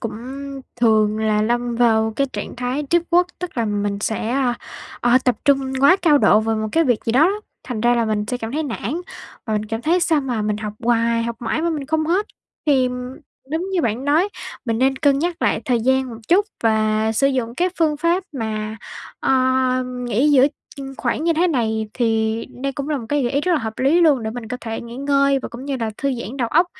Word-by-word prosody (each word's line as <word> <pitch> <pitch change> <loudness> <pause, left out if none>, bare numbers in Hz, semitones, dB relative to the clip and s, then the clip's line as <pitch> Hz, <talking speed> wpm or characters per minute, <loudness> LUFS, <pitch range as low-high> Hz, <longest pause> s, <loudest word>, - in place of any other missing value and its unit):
cũng 230 - -4 0.7
thường 215 -2 +3
là 215 -1 +1
lâm 240 +1 0
vào 220 -2 +3
cái 275 - +2
trạng - - -6
thái 250 +4 -2
deep 345 0 +4
work, 355 +1 +5
tức 360 -8 -5
là 230 - +1
mình 205 -1 -1
sẽ, 220 +1 -2
a, 255 -2 +1 0.5
ờ, 245 +1 +4
tập 250 - +2
trung 270 -2 +2
quá 360 +7 +6
cao 300 -4 +5
độ 215 - +5
vào 220 0 -1
một 215 0 -2
cái 330 0 +3
việc 245 -5 +1
gì 230 - 0
đó 265 +5 +5
á, 355 - +5 0.3
thành 235 -4 -4
ra 240 +1 +3
là 235 -1 +1
mình 210 -1 -1
sẽ 250 - -1
cảm 225 0 -6
thấy 315 +2 -1
nản, 270 - -3 0.5
và 220 - -2
mình 210 0 0
cảm 225 +2 -4
thấy 345 +6 +2
sao 320 -3 +2
mà 245 -6 -2
mình 210 0 -1
học 210 -1 -5
hoài 230 -1 +2
học 235 0 -3
mãi 240 +7 -1
mà 340 - +1
mình 290 -4 -3
không 315 0 0
hết. 380 +5 +1 0.4
Thì 265 -3 +3 0.6
đúng 340 +5 -2
như 355 - +1
bạn 235 +2 -1
nói, 315 +7 +3 0.4
mình 230 -2 -1
nên 265 +1 +2
cân 280 0 +3
nhắc 345 +2 -2
lại - - +2
thời 245 -3 +1
gian 260 +2 +2
một 225 - -8
chút, 400 +4 +4 0.2
và 220 0 +2
sử 275 +5 +2
dụng 250 -4 -1
các 360 +3 0
phương 310 -2 +2
pháp 340 +5 +1
mà, 220 -4 -3 0.4
ơ, 265 - +2 0.5
nghỉ 250 +2 0
giữa 270 -1 +6 0.5
khoảng 260 +6 -1
như 335 - +3
thế 335 +3 +2
này, 220 -6 -1
thì 225 -2 0 0.2
đây 275 0 -1
cũng 280 +2 -5
là 295 -3 0
một 225 - -8
cái 290 -1 +1
gợi 240 - -1
ý 280 - +2
rất 360 +3 +1
là 320 - +3
hợp 220 -2 -5
lý 280 +7 +3
luôn. 295 -8 +4
Để 220 - -3
mình 230 -1 -7
có 250 - -3
thể 225 -1 -4
nghỉ 235 +1 -9
ngơi 275 0 +2
và - - -6
cũng 240 +2 -9
như 280 -1 -2
là 220 -1 -1
thư 275 -1 -1
giãn 235 +5 -6
đầu 240 -4 -1
óc, 340 +6 +4
250 Hz, 235 wpm, -21 LUFS, 225-290 Hz, 0.7 s, quá